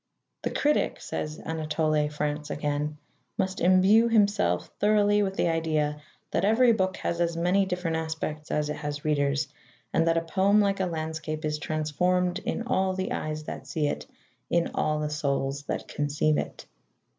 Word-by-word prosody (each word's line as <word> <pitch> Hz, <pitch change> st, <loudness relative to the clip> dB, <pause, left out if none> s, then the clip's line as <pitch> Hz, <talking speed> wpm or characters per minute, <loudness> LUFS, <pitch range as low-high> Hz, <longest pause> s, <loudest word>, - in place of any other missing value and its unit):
"The -, -, -1 dB
critic," 295 Hz, +1 st, +1 dB
says 155 Hz, 0 st, -4 dB
Anatole 155 Hz, -1 st, 0 dB
France 150 Hz, 0 st, -3 dB
again, 150 Hz, 0 st, -2 dB, 0.4 s
"must 190 Hz, 0 st, -1 dB
imbue 190 Hz, +6 st, +5 dB
himself 200 Hz, -, +2 dB
thoroughly 210 Hz, 0 st, +4 dB
with 195 Hz, -1 st, -1 dB
the -, -, +1 dB
idea 155 Hz, -2 st, 0 dB, 0.3 s
that 170 Hz, -, 0 dB
every 230 Hz, +4 st, +5 dB
book 190 Hz, -3 st, 0 dB
has 170 Hz, 0 st, -2 dB
as 170 Hz, -1 st, 0 dB
many 185 Hz, +3 st, +2 dB
different 180 Hz, -3 st, -1 dB
aspects 160 Hz, -1 st, -4 dB
as 150 Hz, 0 st, 0 dB
it 150 Hz, -, -4 dB
has 145 Hz, 0 st, -5 dB
readers, 145 Hz, -1 st, +1 dB, 0.5 s
and 165 Hz, 0 st, +3 dB
that 165 Hz, 0 st, +3 dB
a -, -, +3 dB
poem, 190 Hz, +5 st, +3 dB
like 200 Hz, -1 st, +2 dB
a 190 Hz, -, +1 dB
landscape, 160 Hz, -1 st, -4 dB
is 150 Hz, 0 st, -1 dB
transformed 180 Hz, +4 st, 0 dB
in 230 Hz, -, -3 dB
all 190 Hz, -6 st, +1 dB
the 190 Hz, 0 st, -2 dB
eyes 155 Hz, 0 st, -3 dB
that -, -, -7 dB
see 155 Hz, -2 st, -1 dB
it, 145 Hz, -, -2 dB, 0.4 s
in 170 Hz, 0 st, +1 dB
all 155 Hz, 0 st, +1 dB
the 150 Hz, 0 st, -2 dB
souls 140 Hz, -2 st, -1 dB
that -, -, -3 dB
conceive 145 Hz, +1 st, +1 dB
it." -, -, -6 dB
160 Hz, 170 wpm, -27 LUFS, 150-190 Hz, 0.5 s, imbue